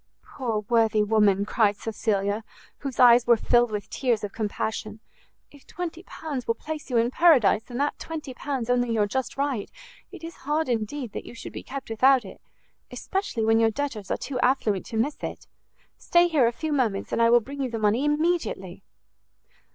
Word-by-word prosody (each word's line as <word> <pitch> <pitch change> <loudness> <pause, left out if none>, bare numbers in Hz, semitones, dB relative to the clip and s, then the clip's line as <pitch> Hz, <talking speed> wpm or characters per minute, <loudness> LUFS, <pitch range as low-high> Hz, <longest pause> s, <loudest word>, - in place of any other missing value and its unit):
"Poor 230 -6 -3
worthy 225 -2 +3
woman!" 205 -2 +3
cried 210 -2 +2
Cecilia, 210 -1 -1 0.4
whose 275 -3 -6
eyes 245 -1 +7
were 235 -1 +6
filled 240 +1 +3
with 210 -1 -4
tears 240 -5 -1
of 205 - -4
compassion, 215 0 -3 0.5
"if 285 -2 -18
20 340 -1 -6
pounds 285 -6 -6
will 230 - +1
place 310 +4 -7
you 245 - +1
in 230 +2 +2
paradise, 255 - +4
and 245 +1 -5
that 290 +1 -1
20 310 -5 -6
pounds 265 -3 -4
only 245 -1 +1
your 215 -2 +2
just 260 +7 -3
right, 275 -7 -1 0.4
it - - -11
is 330 0 -8
hard, 300 +3 -1
indeed, 240 +1 -2
that - - -7
you - - -10
should - - -9
be - - -6
kept 275 0 -7
without 255 +1 +4
it; 190 - -12 0.5
especially 380 - -3
when 225 0 +4
your 225 0 +4
debtors 225 -5 -4
are - - 0
too 260 -3 -4
affluent 230 -7 +1
to 225 - -5
miss 280 +7 0
it. - - -6 0.5
Stay 345 0 +4
here 300 -8 +3
a - - +1
few 310 +5 -3
moments, 225 -8 -1
and - - 0
I 230 - +5
will 240 +1 +6
bring 275 +5 -7
you 260 - -1
the 230 - -4
money 215 +4 +1
immediately." 315 +4 -1
240 Hz, 190 wpm, -25 LUFS, 220-280 Hz, 0.5 s, eyes